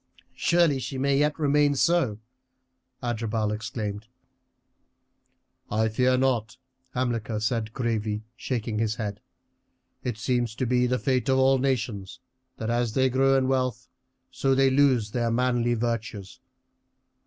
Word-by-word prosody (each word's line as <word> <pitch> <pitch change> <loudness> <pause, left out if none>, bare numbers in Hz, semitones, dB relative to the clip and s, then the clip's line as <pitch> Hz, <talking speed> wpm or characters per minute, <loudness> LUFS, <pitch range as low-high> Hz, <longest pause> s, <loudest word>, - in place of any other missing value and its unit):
"Surely 170 -5 +2
she 130 +1 -5
may 140 +1 +1
yet 150 0 +1
remain 145 -1 +3
so," 140 -8 +2 0.9
Adherbal 110 -2 -1
exclaimed. 105 -1 -4 1.6
"I 110 +1 +1
fear 125 +3 +2
not," 125 -3 0 0.4
Hamilcar 115 -3 -1
said 110 0 -1
gravely, 110 -3 -2
shaking 115 -4 -3
his 110 -1 0
head. 105 -3 -5 0.8
"It 120 -4 -3
seems 120 -1 -1
to 130 - -1
be 125 +1 +2
the 125 +1 +1
fate 130 0 0
of 130 - +4
all 135 0 +4
nations, 120 -7 -2 0.4
that 110 +1 -2
as 120 -2 0
they 130 0 +2
grow 135 +1 +3
in 130 -1 +1
wealth 130 -3 -1 0.4
so 135 -1 +1
they 135 0 +4
lose 130 -6 +3
their 120 0 0
manly 120 0 +1
virtues. 115 -1 -4
120 Hz, 130 wpm, -26 LUFS, 110-130 Hz, 1.6 s, of